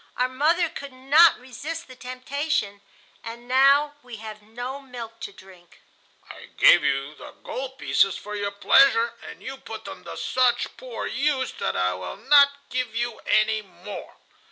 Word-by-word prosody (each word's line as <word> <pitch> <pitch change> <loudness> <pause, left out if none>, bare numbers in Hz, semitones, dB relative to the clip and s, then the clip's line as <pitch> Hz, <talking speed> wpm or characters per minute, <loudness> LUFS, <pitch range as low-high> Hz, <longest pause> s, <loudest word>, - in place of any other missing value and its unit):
Our 250 - +2
mother 320 +7 +2
could 280 -3 -9
not 290 +6 +5
resist 300 +7 -7
the 255 - -12
temptation, 255 -4 -3 0.4
and 235 +1 -9
now 275 +3 +4
we 245 -3 -10
have 215 -1 -9
no 245 +6 -7
milk 235 -4 -9
to - - -6
drink. 185 -3 -18 0.5
I - - -11
gave - - +7
you 135 +2 0
the - - -11
gold 265 0 -6
pieces 195 -6 +2
for 210 +1 -7
your 205 -1 -2
pleasure, 230 +3 +4 0.2
and - - -12
you 265 +1 -6
put - - -9
them - - -9
to - - -8
such 250 -1 +1
poor - - -7
use 270 -2 0
that - - -1
I 90 0 +1
will 90 0 -6
not 280 0 +6 0.2
give 250 -3 -2
you 240 -1 -2
any 215 0 +3
more. 190 +1 -10
250 Hz, 165 wpm, -24 LUFS, 215-275 Hz, 0.5 s, gave